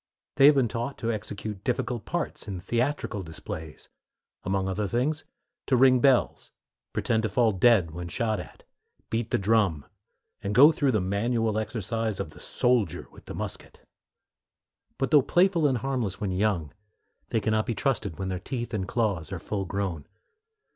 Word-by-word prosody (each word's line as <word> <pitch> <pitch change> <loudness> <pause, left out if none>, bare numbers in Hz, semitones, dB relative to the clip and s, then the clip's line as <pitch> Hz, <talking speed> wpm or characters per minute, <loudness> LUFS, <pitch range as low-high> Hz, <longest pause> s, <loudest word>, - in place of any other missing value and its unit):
They 135 - +8
have 150 - +7
been 130 -3 +3
taught 120 +5 -4
to 115 - -1
execute 105 -2 -6
difficult 125 -3 -2
parts - - -4
in 95 -3 -4
theatrical 120 +1 -1
displays; 80 -2 -8 0.6
among 95 +1 0
other 100 +2 -1
things, 135 - -1 0.4
to 130 - +3
ring 130 0 +6
bells, 130 -1 +2 0.4
pretend 110 - 0
to 110 - -1
fall 115 +2 +3
dead 95 -4 +4
when 85 +2 -6
shot 110 +4 -1
at, - - -10 0.5
beat 115 0 -1
the - - +2
drum, 100 -7 +2 0.6
and 105 -1 -3
go 145 +5 +9
through 145 -4 +1
the 110 - +3
manual 110 +3 0
exercise 110 -1 -3
of 75 - -4
the - - -15
soldier 120 -4 0
with - - -16
the - - -7
musket. - - -7 1.1
But 135 - -1
though 150 - +7
playful 175 +1 +3
and 130 -3 +1
harmless 125 -6 -2
when 100 -3 -2
young, 90 -6 0 0.6
they 115 - +1
can 110 +1 -1
not 110 0 +1
be 115 - -1
trusted 110 - -1
when 95 -1 -3
their 90 -1 -2
teeth 120 +3 -5
and 95 -3 -2
claws 100 -7 -1
are 95 - -3
full 95 +4 -3
grown. 95 -5 -3
110 Hz, 170 wpm, -27 LUFS, 95-125 Hz, 1.1 s, go